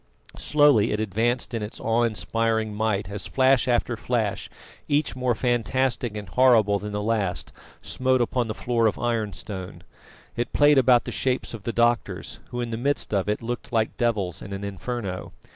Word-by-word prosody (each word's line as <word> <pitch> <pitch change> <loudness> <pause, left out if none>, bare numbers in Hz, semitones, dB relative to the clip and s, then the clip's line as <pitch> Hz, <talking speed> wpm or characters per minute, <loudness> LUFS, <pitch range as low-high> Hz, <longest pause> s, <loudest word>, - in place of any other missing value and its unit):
Slowly 145 -8 +4
it 105 - -1
advanced 115 +5 -1
in 115 - -2
its 105 +2 -6
awe 115 +1 +1
inspiring 115 -1 0
might 105 -2 -1
as 100 +1 -4
flash 130 -1 +3
after 120 -1 +1
flash, 115 -2 -2 0.4
each 145 -1 +1
more 125 -2 0
fantastic 120 -1 0
and 105 -2 -6
horrible 110 -1 +4
than 105 +1 -6
the 105 0 -3
last, 105 -5 -1 0.3
smote 130 0 +1
upon 120 0 0
the 110 - -4
floor 115 -2 +1
of 110 - -1
ironstone. 105 -5 -4 0.5
It 120 +1 -3
played 145 -1 +5
about 125 -2 +5
the - - -6
shapes 130 -2 -1
of 110 -4 -9
the 115 - -1
doctors, 120 +1 0
who 120 -1 -4
in 120 -1 -4
the 115 - -2
midst 140 -1 -1
of 100 0 0
it 105 +2 -1
looked 120 +1 -5
like 110 -2 0
devils 105 -7 -1
in 100 - -7
an 100 +1 -5
inferno. 100 -1 -5
115 Hz, 175 wpm, -25 LUFS, 105-125 Hz, 0.5 s, played